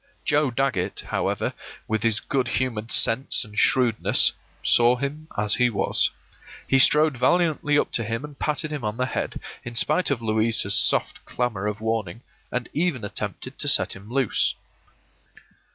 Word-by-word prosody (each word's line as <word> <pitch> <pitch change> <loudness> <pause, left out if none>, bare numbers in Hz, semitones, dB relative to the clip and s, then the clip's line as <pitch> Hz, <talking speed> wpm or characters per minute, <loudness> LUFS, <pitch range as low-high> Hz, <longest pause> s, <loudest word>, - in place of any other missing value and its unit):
Joe 150 -1 +2
Dagget, 130 0 -1
however, - - -2 0.3
with 110 -1 -1
his 110 -2 +1
good 130 -3 -1
humored 115 -4 -2
sense 125 +2 +1
and 105 0 -14
shrewdness, 120 -1 +3 0.3
saw 120 +1 +5
him 140 +4 -5
as 105 0 +1
he 125 -1 +3
was. 105 - +1 0.6
He 135 - +3
strode 150 +2 +5
valiantly 150 +1 +2
up - - 0
to 115 - -1
him 115 +4 -4
and 145 -2 -14
patted 155 +1 -2
him 150 -4 -5
on 105 +1 -3
the 130 - 0
head, 130 - -4 0.2
in 120 -1 -8
spite 155 +9 +2
of 140 -5 0
Louisa's 110 0 +1
soft - - +2
clamor 110 -5 -2
of 105 +1 -4
warning, 110 -1 -3 0.3
and 125 -1 -3
even 150 -8 -1
attempted 100 - -6
to - - -1
set - - +3
him 100 +3 -13
loose. 135 -3 +1
125 Hz, 160 wpm, -24 LUFS, 110-140 Hz, 0.6 s, saw